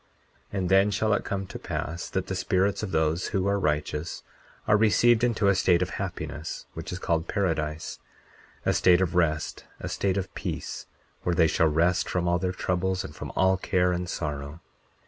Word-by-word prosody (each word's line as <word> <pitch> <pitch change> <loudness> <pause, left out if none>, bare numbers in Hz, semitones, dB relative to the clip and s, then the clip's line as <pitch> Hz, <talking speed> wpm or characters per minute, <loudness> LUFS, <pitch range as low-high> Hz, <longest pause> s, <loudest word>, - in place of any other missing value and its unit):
40:12 - - -4
And 90 -2 0
then 95 +2 +5
shall 105 +1 +1
it - - +1
come 100 -1 -3
to - - -8
pass, 85 +3 -4
that 95 -1 -2
the - - -4
spirits 95 +1 +1
of 105 - -3
those 80 0 +1
who 95 -1 0
are 100 0 +2
righteous 75 -1 -2 0.4
are - - +5
received 110 +2 +4
into 115 -4 +2
a 100 - +6
state 90 -1 +3
of 90 - -5
happiness, 80 +3 -5
which - - -6
is 90 - -3
called 85 -3 -1
paradise, 80 -6 -2 0.7
a - - +3
state 90 -1 +5
of 95 -1 0
rest, 80 -3 0
a - - -5
state 100 -1 0
of 95 -2 -3
peace, - - -5 0.3
where 90 - 0
they 85 - +5
shall 80 0 +3
rest 85 +4 +2
from 90 -1 0
all 85 0 +2
their 90 0 -1
troubles 95 +1 -1
and - - -8
from - - -6
all 95 0 +3
care, 90 -1 +1
and 90 0 -2
sorrow. 75 -1 -4
90 Hz, 195 wpm, -27 LUFS, 85-95 Hz, 0.7 s, a